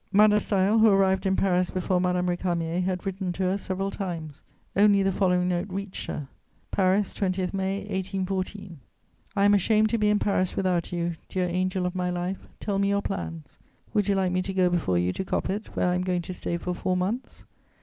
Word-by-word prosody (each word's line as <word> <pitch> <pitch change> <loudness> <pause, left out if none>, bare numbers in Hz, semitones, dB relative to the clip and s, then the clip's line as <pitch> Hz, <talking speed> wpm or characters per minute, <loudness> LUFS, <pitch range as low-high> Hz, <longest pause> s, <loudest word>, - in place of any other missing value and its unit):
Madame 210 +1 +6
de - - +4
Staël, 200 +2 +2
who 220 - +7
arrived 195 -1 +3
in 190 - +2
Paris 185 -2 +2
before 185 0 0
Madame 180 0 +1
Récamier, 175 -1 -1
had 185 0 -2
written 190 -1 -2
to 185 +2 -3
her 185 +1 +1
several 195 0 -3
times; 165 -8 -5 0.3
only 200 0 +5
the 195 - +2
following 180 -2 +2
note 180 +2 -1
reached 195 +1 -5
her: 145 - -4 0.4
"PARIS, 195 +1 +2
20 185 -2 -1
May 195 +1 -1
1814. 190 -2 -3 0.6
"I 200 0 +3
am 205 - +6
ashamed 215 +2 +3
to 230 - 0
be 210 0 +3
in 210 - +4
Paris 185 -3 0
without 185 -3 0
you, 170 -1 -2
dear 185 -1 0
angel 185 +1 -1
of 180 - -1
my 180 -1 -1
life: 180 +2 -3
tell 200 -2 -1
me 200 0 +2
your 200 0 +1
plans. 80 -2 -5 0.3
Would 205 -2 +2
you 200 - +2
like 190 -2 +1
me 185 0 +1
to 190 +1 -4
go 180 -1 +3
before 155 - +1
you 90 +1 +1
to - - -3
Coppet, 195 +2 -3
where 180 - +2
I - - +1
am 180 - 0
going 180 -1 -1
to 185 - -6
stay 170 -1 -3
for 180 +1 -3
four 185 +1 -1
months? 210 +8 -3
185 Hz, 210 wpm, -26 LUFS, 180-195 Hz, 0.6 s, who